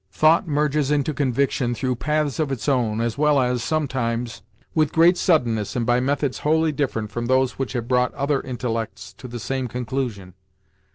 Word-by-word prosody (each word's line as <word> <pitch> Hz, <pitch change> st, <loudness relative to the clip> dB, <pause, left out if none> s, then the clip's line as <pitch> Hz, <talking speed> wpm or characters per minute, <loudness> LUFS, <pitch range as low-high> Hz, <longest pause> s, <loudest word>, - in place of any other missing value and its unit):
Thought 160 Hz, +2 st, +3 dB
merges 150 Hz, -1 st, +1 dB
into 150 Hz, +1 st, +1 dB
conviction 130 Hz, -2 st, 0 dB
through 125 Hz, +1 st, -1 dB
paths 150 Hz, 0 st, -1 dB
of 150 Hz, -3 st, 0 dB
its 115 Hz, -5 st, -4 dB
own, 115 Hz, -5 st, +1 dB
as 115 Hz, +2 st, -2 dB
well 150 Hz, -1 st, +4 dB
as, 125 Hz, -1 st, +1 dB
sometimes, 125 Hz, -6 st, -2 dB, 0.3 s
with 155 Hz, -2 st, +2 dB
great 170 Hz, +2 st, +5 dB
suddenness 120 Hz, -, +1 dB
and 120 Hz, -2 st, 0 dB
by 120 Hz, +1 st, +3 dB
methods 140 Hz, +1 st, -1 dB
wholly 160 Hz, +1 st, +2 dB
different 125 Hz, -7 st, -2 dB
from 120 Hz, 0 st, -3 dB
those 130 Hz, 0 st, +1 dB
which 135 Hz, -1 st, -2 dB
have 120 Hz, -2 st, -3 dB
brought 125 Hz, 0 st, +2 dB
other 140 Hz, 0 st, 0 dB
intellects 120 Hz, -3 st, -4 dB
to 130 Hz, -, -10 dB
the 120 Hz, 0 st, -6 dB
same 130 Hz, +3 st, -2 dB
conclusion. 120 Hz, -6 st, -4 dB
130 Hz, 175 wpm, -23 LUFS, 120-145 Hz, 0.3 s, great